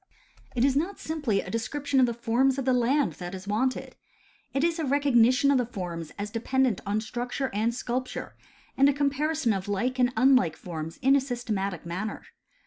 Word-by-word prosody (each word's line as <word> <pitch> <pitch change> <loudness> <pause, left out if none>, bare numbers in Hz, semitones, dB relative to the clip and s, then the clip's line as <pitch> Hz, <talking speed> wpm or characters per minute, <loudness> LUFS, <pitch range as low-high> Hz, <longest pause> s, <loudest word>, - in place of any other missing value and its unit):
It 245 +1 +3
is 275 -1 +2
not 345 +8 -1
simply 290 -11 -1
a - - -8
description 270 +5 -1
of 255 - +5
the 235 - -1
forms 245 +3 +2
of 270 - -2
the 260 - +3
land 255 +4 +2
that 175 +1 -5
is 190 +1 -9
wanted. 250 +5 -1 0.6
It 275 - 0
is 335 0 +1
a - - -1
recognition 275 -1 +4
of 270 - +4
the 245 - +1
forms 175 -7 -6
as 205 +1 -4
dependent 245 0 0
on 205 +1 +1
struc 240 +2 -5
ture 270 -1 -1
and 220 +3 +1
sculpture, 250 +1 -4 0.4
and 275 +1 +5
a - - +2
comparison 285 -2 0
of 195 0 -4
like 240 +6 -1
and 250 0 +3
unlike 250 - +4
forms 160 -2 -6
in 270 +1 +5
a 280 - +4
systematic 215 - -3
manner. 185 +6 -4
245 Hz, 195 wpm, -27 LUFS, 210-275 Hz, 0.6 s, of